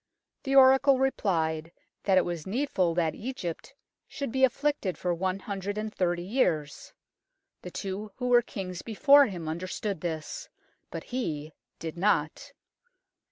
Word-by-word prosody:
The 270 0 -1
oracle 265 +1 +7
replied 165 -11 0 0.3
that 190 -2 +4
it 185 - +4
was 170 -2 -4
needful 190 - 0
that 165 -3 +1
Egypt 250 -1 -6 0.3
should 280 -5 -5
be 265 +2 0
afflicted 265 -6 +1
for 180 -1 -1
one 185 +2 -1
hundred 200 +1 -4
and 215 0 -3
thirty 175 -1 0
years. 175 - -1 0.7
The 180 - -7
two 200 +3 -5
who 250 -1 -2
were 240 -1 +6
kings 185 -6 -6
before 280 +6 +5
him 175 -6 -6
understood 185 +3 -3
this, 175 - -5 0.4
but - - -6
he 155 - -4 0.2
did 165 +1 -6
not. 185 - 0
190 Hz, 140 wpm, -28 LUFS, 170-255 Hz, 0.7 s, oracle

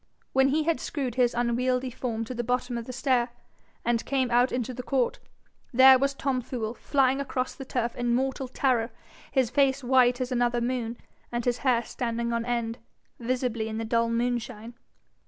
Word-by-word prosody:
When 265 0 +5
he 305 +3 +2
had 330 +1 +1
screwed 270 -6 -3
his 245 -1 +2
unwieldy 250 +2 0
form 230 -2 -3
to 255 - -6
the 240 0 -3
bottom 245 0 -1
of 235 -1 -4
the 255 - -6
stair, 250 -2 +1 0.6
and 235 -1 +1
came 260 -3 0
out 245 +2 +4
into 250 0 -2
the 250 - -5
court, 250 -1 0 0.5
there 260 +1 +8
was 275 +1 0
Tom 270 -2 -1
Fool 230 -2 -4
flying 270 +1 +1
across 255 -2 -2
the 270 - -9
turf 240 -2 -2
in 240 -1 +1
mortal 265 +1 -1
terror, 250 -3 +1 0.4
his 260 -4 +1
face 275 0 +2
white 250 0 +4
as 255 0 -2
another 240 -1 +1
moon, 240 -1 -2 0.3
and 240 -1 -2
his 245 -1 +1
hair 245 -4 +2
standing 235 0 -3
on 235 0 -1
end 235 -1 -2 0.4
visibly 240 -2 -1
in 220 0 -4
the 225 - -3
dull 230 +1 +1
moonshine. 235 -1 -2
245 Hz, 185 wpm, -27 LUFS, 235-260 Hz, 0.6 s, there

